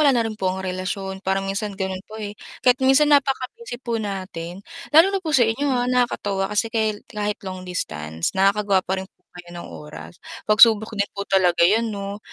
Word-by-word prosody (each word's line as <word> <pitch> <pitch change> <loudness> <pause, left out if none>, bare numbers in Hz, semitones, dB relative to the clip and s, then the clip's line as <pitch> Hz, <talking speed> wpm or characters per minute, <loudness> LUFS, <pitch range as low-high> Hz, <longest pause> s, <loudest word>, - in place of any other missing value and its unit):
wala 290 -2 +6
na 230 - +2
rin 220 - -4
po 190 - 0
ang 190 +1 -5
relasyon. 190 +1 -4
Parang 195 0 0
minsan 200 +1 -3
ganun 190 -1 -3
po, 220 - -9
eh. 210 -2 -5 0.3
Kahit 250 +1 +4
minsan 280 +3 +5
napaka-busy 275 - 0
po 235 -3 -3
natin 185 -2 -6 0.3
lalo 330 +6 +6
na 390 - 0
po 320 - -3
sa 245 - +5
inyo, 270 +6 0
ha. 245 -2 +1
Nakakatuwa 220 -6 0
kasi 210 +2 +2
kahi 220 -1 +2 0.2
kahit 210 -1 -3
long 185 -1 -5
distance 80 - -3
nakakagawa 195 0 +3
pa 185 - -4
rin 190 - -6
po - - -48 0.2
kayo 175 -1 -11
ng - - -10
oras. 80 +1 -10 0.3
Pagsubok 220 0 +6
din 200 - +2
po 200 - -3
talaga 180 -3 +3
'yan 215 +7 +4
'no? 200 0 -5
200 Hz, 200 wpm, -22 LUFS, 190-235 Hz, 0.3 s, wala